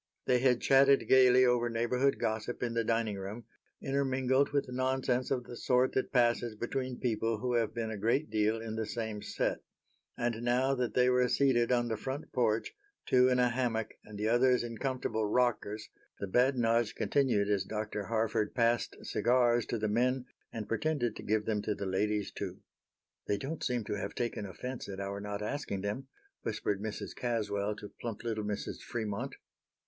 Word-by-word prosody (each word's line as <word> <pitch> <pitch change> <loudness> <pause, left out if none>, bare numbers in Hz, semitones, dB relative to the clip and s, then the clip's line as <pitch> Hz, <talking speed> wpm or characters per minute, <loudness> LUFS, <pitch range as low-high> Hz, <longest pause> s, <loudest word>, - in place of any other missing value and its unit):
They 125 - +3
had 125 -1 +3
chatted 135 +1 +5
gaily 130 -1 +6
over 120 -1 +2
neighborhood 125 +4 +1
gossip 110 +3 -2
in 120 -1 -1
the 115 0 +1
dining 115 -3 0
room, 105 +5 -6 0.4
intermingled 135 0 +1
with 140 -1 0
nonsense 130 0 0
of 125 -2 0
the 120 - -9
sort 125 +1 +2
that 130 - -1
passes 120 -2 +2
between 125 +3 -3
people 115 -2 0
who 125 +3 -2
have 115 -2 +1
been 115 -1 -2
a 110 - -4
great 120 +9 +1
deal 110 +1 +1
in 110 -1 -5
the 110 -1 -2
same 110 -3 -4
set. - - -1 0.6
And 120 -1 -1
now 125 +3 +2
that 125 -3 -2
they 125 0 +4
were 125 0 +3
seated 125 -3 +3
on 120 -1 +2
the 110 -2 -2
front 135 +7 -5
porch, 115 -3 +1 0.3
two 125 0 +5
in 125 - +3
a 125 0 +4
hammock 120 -3 -1
and 105 -1 -10
the 105 +1 -1
others 125 +2 +4
in 115 -1 -6
comfortable 125 -5 -1
rockers, 110 -2 0 0.3
the - - -2
badinage 120 0 +2
continued 125 -8 +2
as 100 -2 +1
Dr. 105 0 -4
Harford 110 0 0
passed 120 -1 +1
cigars 120 -1 +2
to 120 - -1
the 110 0 -1
men 125 +4 +1 0.3
and 110 -3 -5
pretended 130 -1 0
to - - -7
give 105 0 0
them 105 -2 0
to 105 0 -2
the 100 - -4
ladies, 105 +2 0
too. - - -5 0.7
"They 100 - +1
don't 145 +8 -5
seem 125 -2 0
to 105 0 -3
have 100 - -5
taken 120 -4 -2
offense 125 +6 -6
at 95 -1 -6
our 100 0 -4
not 105 0 -4
asking 105 -5 -3
them," 105 +7 -3 0.3
whispered 100 -1 -2
Mrs. 110 0 -5
Caswell 105 -4 -1
to 105 -1 -10
plump 115 -2 -5
little 110 -2 -2
Mrs. 105 -1 -4
Fremont. 115 +3 -4
120 Hz, 185 wpm, -32 LUFS, 105-125 Hz, 0.7 s, gaily